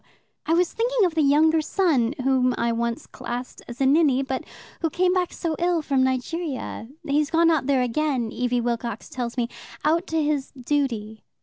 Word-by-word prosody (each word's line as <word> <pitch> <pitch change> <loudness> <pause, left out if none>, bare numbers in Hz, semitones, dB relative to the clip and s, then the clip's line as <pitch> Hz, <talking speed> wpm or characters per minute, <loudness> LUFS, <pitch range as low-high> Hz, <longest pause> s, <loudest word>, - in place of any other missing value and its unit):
"I 325 - +3
was 355 0 +2
thinking 475 -2 +2
of 350 - 0
the 320 - +2
younger 310 +3 +4
son, 295 -8 +1
whom 255 -1 +2
I 235 0 +1
once 235 0 -2
classed 245 +1 -6
as 240 0 -9
a 270 - +2
ninny, 275 -2 +4
but 265 -1 -3 0.4
who 325 - +1
came 360 +3 +2
back 365 -2 0
so 330 -3 -3
ill 345 -2 +1
from 275 -2 +1
Nigeria. 260 -1 -2 0.2
He's 290 +1 +1
gone 330 0 +4
out 295 -5 +1
there 270 -3 +3
again, 250 -2 0
Evie 245 0 0
Wilcox 235 -2 -3
tells 245 -1 -4
me 240 -1 +1 0.4
out 335 +4 +2
to 320 -1 0
his 295 -2 -1
duty." 245 -6 -2
280 Hz, 185 wpm, -24 LUFS, 245-325 Hz, 0.4 s, younger